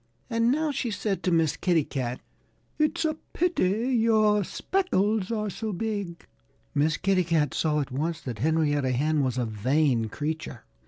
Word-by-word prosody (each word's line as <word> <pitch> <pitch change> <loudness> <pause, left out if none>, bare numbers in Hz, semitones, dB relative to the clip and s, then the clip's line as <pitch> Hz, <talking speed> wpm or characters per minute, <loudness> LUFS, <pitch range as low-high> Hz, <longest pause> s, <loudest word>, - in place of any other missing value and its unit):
And 230 +1 +2
now 305 +2 +1
she 260 -3 -2
said 205 -1 -2
to 185 - 0
Miss 165 -3 +2
Kitty 175 -4 +2
Cat, 125 -3 -4 0.6
"It's 305 +2 +1
a 310 0 0 0.2
pity 240 - +1
your 215 -3 +3
speckles 215 - 0
are 215 -2 -1
so 220 +3 -4
big." 200 -3 -4 0.5
Miss 150 +2 +2
Kitty 190 -1 +2
Cat 160 -5 +1
saw 150 -2 +1
at 140 - -5
once 155 +5 -2
that 120 -5 -6
Henrietta 145 -2 +1
Hen 150 +4 +1
was 130 -2 -1
a 125 - 0
vain 120 +3 +1
creature. 150 0 -4
170 Hz, 160 wpm, -27 LUFS, 145-220 Hz, 0.6 s, your